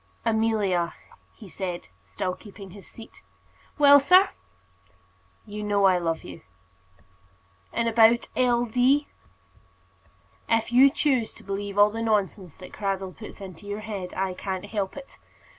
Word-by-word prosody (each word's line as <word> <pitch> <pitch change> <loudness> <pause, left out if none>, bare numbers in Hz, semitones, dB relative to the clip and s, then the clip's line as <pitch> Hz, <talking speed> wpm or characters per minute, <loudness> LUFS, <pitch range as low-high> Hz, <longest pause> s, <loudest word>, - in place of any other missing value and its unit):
"Amelia," 215 -6 +1 0.4
he 215 - -13
said, 180 - -6
still 180 - -4
keeping 200 -1 -12
his 200 +1 -13
seat. 225 - -14 0.6
"Well, 285 -1 +8
sir?" 365 +7 +5 1.2
"You 210 0 -7
know 205 -1 +1
I 185 -2 +4
love 165 -2 -2
you." 165 - -10 1.3
"And 230 - -1
about 230 +1 +4
L. 245 -1 +2
D.?" 255 +5 +2 1.4
"If 225 0 +1
you 260 +3 +7
choose 270 -5 0
to - - -15
believe 200 +1 -5
all 205 +1 +6
the 225 +1 -5
nonsense 200 -6 -1
that 185 - -12
Cradell 195 -2 -3
puts 215 - -11
into 190 0 -10
your 205 +1 -4
head, 200 -4 -6
I 190 -1 -1
can't 190 +1 -5
help 205 +1 -4
it. 275 -1 -12
205 Hz, 140 wpm, -25 LUFS, 190-230 Hz, 1.4 s, Well